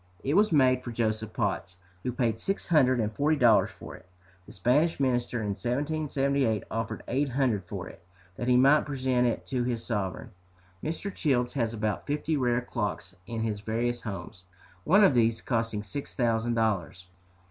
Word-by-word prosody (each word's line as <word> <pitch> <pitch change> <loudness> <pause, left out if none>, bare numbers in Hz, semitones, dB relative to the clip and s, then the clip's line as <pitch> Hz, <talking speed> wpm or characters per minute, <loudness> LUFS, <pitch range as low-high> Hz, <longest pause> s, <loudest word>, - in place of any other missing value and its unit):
It 140 - 0
was 210 +3 +4
made 130 -4 +4
for 120 - -5
Joseph 110 -1 -1
Potts, 95 -6 -2 0.2
who 125 - -2
paid 115 -3 0
six 195 - -2
hundred 130 -7 +4
and 110 -1 -1
forty 150 +6 +2
dollars 120 -5 +5
for - - -10
it. - - -16 0.4
The - - -11
Spanish 140 - +2
Minister 120 -3 0
in 105 - -2
1778 140 0 0
offered 115 0 -3
eight 140 +3 0
hundred 120 -7 0
for 90 0 -6
it, 90 - -13 0.3
that 120 - -4
he 125 0 +5
might 140 +5 +5
present 130 -3 +1
it 120 - -2
to 125 -3 -1
his 120 -2 -2
sovereign. 100 -5 -3 0.5
Mr. 165 +5 -3
Childs 125 -5 0
has 115 -5 0
about 105 -1 -2
fifty 150 +2 -1
rare 125 -3 +1
clocks 100 -6 -4
in 115 -1 -3
his 110 -2 -2
various 115 +3 -2
homes, 95 -2 -7 0.4
one 195 +6 +6
of 190 - +6
these 115 -2 +3
costing 115 -4 -2
six 125 +8 -6
thousand 115 -1 +1
dollars. 100 -5 -1
120 Hz, 175 wpm, -28 LUFS, 110-135 Hz, 0.5 s, one